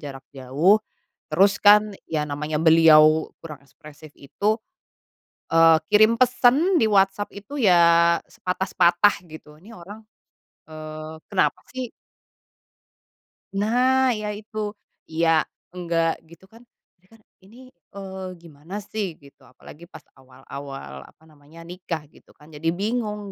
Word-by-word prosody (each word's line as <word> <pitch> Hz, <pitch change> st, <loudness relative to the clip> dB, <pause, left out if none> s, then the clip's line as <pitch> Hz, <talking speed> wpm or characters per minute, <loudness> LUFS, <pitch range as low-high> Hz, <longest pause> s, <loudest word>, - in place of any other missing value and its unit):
jarak 135 Hz, -2 st, -10 dB
jauh 145 Hz, +11 st, +2 dB, 0.5 s
terus, 195 Hz, +6 st, +2 dB
kan, 210 Hz, 0 st, +5 dB, 0.2 s
ya, 155 Hz, -2 st, -2 dB
namanya 150 Hz, +1 st, -4 dB
beliau 160 Hz, -1 st, +5 dB, 0.2 s
kurang 150 Hz, -4 st, -9 dB
ekspresif 150 Hz, +1 st, -16 dB
itu, 205 Hz, +10 st, -2 dB, 0.9 s
eee, 165 Hz, -1 st, +5 dB
kirim 215 Hz, +3 st, +4 dB
pesan 255 Hz, +8 st, +3 dB
di 240 Hz, -, +3 dB
WhatsApp 200 Hz, -1 st, +1 dB
itu, 205 Hz, +8 st, -10 dB
ya, 170 Hz, -6 st, +4 dB
sepatah-sepatah 180 Hz, +1 st, +1 dB
gitu 155 Hz, -2 st, -14 dB
ini 195 Hz, +9 st, -16 dB
orang, 205 Hz, +2 st, -12 dB, 0.7 s
eee, 155 Hz, 0 st, -9 dB
kenapa 195 Hz, -, 0 dB
sih? 255 Hz, -2 st, -5 dB, 1.7 s
Nah, 250 Hz, +5 st, +2 dB
ya, 215 Hz, -2 st, -4 dB
itu 210 Hz, 0 st, -6 dB, 0.3 s
iya, 165 Hz, 0 st, +2 dB, 0.3 s
enggak, 170 Hz, -2 st, -2 dB
gitu, 170 Hz, +2 st, -18 dB
kan, 230 Hz, +2 st, -19 dB, 0.3 s
ini, 180 Hz, -, -33 dB
kan, 225 Hz, +2 st, -22 dB, 0.2 s
ini, 195 Hz, +5 st, -19 dB, 0.4 s
eee, 190 Hz, -1 st, -8 dB, 0.2 s
gimana 160 Hz, +3 st, -12 dB
sih? 195 Hz, -5 st, -5 dB
Gitu. 140 Hz, -2 st, -21 dB
Apalagi 150 Hz, +6 st, -16 dB
pas -, -, -14 dB, 0.2 s
awal-awal 130 Hz, -, -11 dB
apa -, -, -24 dB
namanya 155 Hz, +1 st, -17 dB
nikah 170 Hz, -2 st, -7 dB
gitu -, -, -23 dB
kan 150 Hz, +1 st, -19 dB
jadi 155 Hz, +2 st, -6 dB
bingung 210 Hz, 0 st, -3 dB
170 Hz, 125 wpm, -23 LUFS, 155-210 Hz, 1.7 s, kan